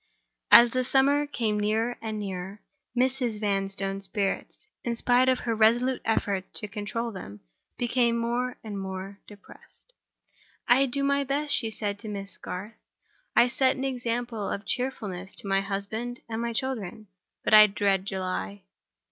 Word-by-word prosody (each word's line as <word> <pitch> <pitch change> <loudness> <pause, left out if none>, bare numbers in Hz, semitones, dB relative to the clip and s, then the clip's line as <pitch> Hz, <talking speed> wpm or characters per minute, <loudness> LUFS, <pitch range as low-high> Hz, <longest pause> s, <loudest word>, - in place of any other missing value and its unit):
As 235 0 +9
the 255 +1 0
summer 280 +3 +3
came 220 -7 -1
nearer 220 +3 0
and 220 -1 -4
nearer, 195 0 -6 0.3
Mrs. 250 -3 +1
Vanstone's 195 -1 -2
spirits, 200 - -3 0.2
in 235 -1 -1
spite 245 +2 +3
of 255 - +1
her 230 - -1
resolute 235 +4 +3
efforts 200 -4 0
to 210 - -5
control 215 +3 -4
them, 105 - -9 0.4
became 240 -1 +1
more 240 +2 -1
and 205 -3 -5
more 190 +1 -6
depressed. 205 - -17 0.7
"I 270 +3 +5
do 275 +2 0
my 280 0 +2
best," 285 +2 -1
she 225 - +4
said 205 -2 -2
to 220 - -9
Miss 195 -3 -6
Garth; 200 +5 -6 0.6
"I 240 - +6
set 260 +1 +2
an 265 - -4
example 240 -4 -2
of 200 - -4
cheerfulness 205 -7 -3
to - - -8
my 195 0 +2
husband 215 +5 -4
and 225 0 -3
my 235 0 -1
children—but 215 -7 -5
I 215 0 +10
dread 195 -1 0
July." 185 - -4
220 Hz, 150 wpm, -27 LUFS, 195-245 Hz, 0.7 s, I